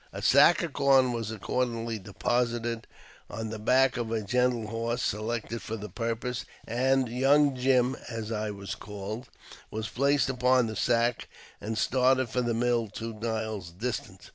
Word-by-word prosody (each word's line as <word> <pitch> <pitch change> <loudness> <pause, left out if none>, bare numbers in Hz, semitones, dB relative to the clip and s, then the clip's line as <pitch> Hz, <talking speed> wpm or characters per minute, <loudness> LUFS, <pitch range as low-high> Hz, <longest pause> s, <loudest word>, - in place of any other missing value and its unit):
A - - -7
sack - - +6
of 165 -4 -4
corn 135 -3 +4
was 115 -2 -3
accordingly 115 +1 -2
deposited 115 +3 -1 0.4
on 110 -1 -5
the 110 - -5
back 130 +4 +3
of 115 -2 -3
a 110 -2 -1
gentle 125 +1 +1
horse 115 +2 -2
selected 110 +2 -2
for 110 - -5
the 105 0 -7
pur 115 -1 -2
pose, 125 +1 -4 0.2
and 130 +2 +2
''Young 135 +4 +3
Jim" 125 0 +2
(as 115 -2 -5
I 110 -1 -2
was 100 -1 -5
called) 105 +4 -7 0.4
was 110 0 -4
placed 140 0 +2
upon 125 -1 +3
the 110 -1 -4
sack, 120 +1 +1 0.3
and 110 +2 -3
started 130 +1 +2
for 125 +3 0
the 120 -2 0
mill 120 -1 +1
two 115 +2 -6
miles 110 -4 -3
distant. 110 +9 -5
115 Hz, 165 wpm, -28 LUFS, 110-125 Hz, 0.4 s, sack